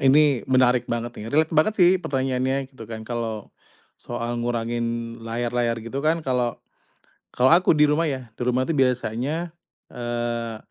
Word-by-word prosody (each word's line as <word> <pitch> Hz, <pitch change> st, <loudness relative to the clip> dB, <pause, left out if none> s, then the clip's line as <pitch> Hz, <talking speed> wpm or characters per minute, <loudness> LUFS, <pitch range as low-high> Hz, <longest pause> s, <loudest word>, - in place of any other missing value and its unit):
Ini 140 Hz, -1 st, +4 dB
menarik 125 Hz, -1 st, +3 dB
banget 120 Hz, 0 st, -2 dB
nih 110 Hz, -, -6 dB
relate 155 Hz, +6 st, +2 dB
banget 160 Hz, +7 st, +3 dB
sih 180 Hz, -2 st, +6 dB
pertanyaannya 130 Hz, -1 st, -1 dB
gitu 115 Hz, -4 st, -11 dB
kan 110 Hz, -1 st, -7 dB
kalo, 115 Hz, -2 st, -4 dB, 0.5 s
soal 120 Hz, 0 st, -4 dB
ngurangin 115 Hz, 0 st, -2 dB
layar-layar 120 Hz, +1 st, -1 dB
gitu 125 Hz, +4 st, -4 dB
kan 160 Hz, +2 st, +1 dB
kalau 125 Hz, -3 st, 0 dB, 0.7 s
kalau 130 Hz, +5 st, +4 dB
aku 170 Hz, -2 st, +4 dB
di 150 Hz, -, +6 dB
rumah 150 Hz, +2 st, +2 dB
ya 130 Hz, -5 st, -6 dB
di -, -, -12 dB
rumah 125 Hz, +1 st, +1 dB
tuh 165 Hz, -, -1 dB
biasanya, 135 Hz, +5 st, 0 dB, 0.4 s
eee, 120 Hz, -1 st, -3 dB
125 Hz, 150 wpm, -24 LUFS, 115-140 Hz, 0.7 s, sih